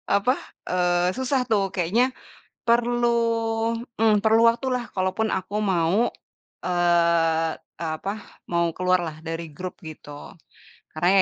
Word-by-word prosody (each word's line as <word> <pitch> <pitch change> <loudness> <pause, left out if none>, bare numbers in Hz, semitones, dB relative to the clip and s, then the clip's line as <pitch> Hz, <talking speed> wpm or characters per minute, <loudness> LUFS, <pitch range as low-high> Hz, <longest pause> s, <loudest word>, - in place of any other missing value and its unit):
apa, 225 +6 +3 0.4
eee, 180 0 +2
susah 260 0 +1
tuh 200 -3 +2
kayaknya 225 +9 +1 0.5
perlu, 240 0 +2 0.9
mmm, 215 -2 +4
perlu 220 +1 +4
waktu 235 +3 -2
lah 250 -1 -1
kalaupun 190 +4 0
aku 190 +2 -3
mau, 190 +3 +2 0.6
eee 170 -2 +2 0.3
eee, 165 -2 -2
apa 195 +5 -4 0.4
mau 170 0 +2
keluar 185 0 +3
lah 155 - -6
dari 165 +1 -4
grup 180 +4 -7
gitu. 155 -1 -10 0.9
Karena 175 +3 +1
185 Hz, 125 wpm, -24 LUFS, 170-225 Hz, 0.9 s, mmm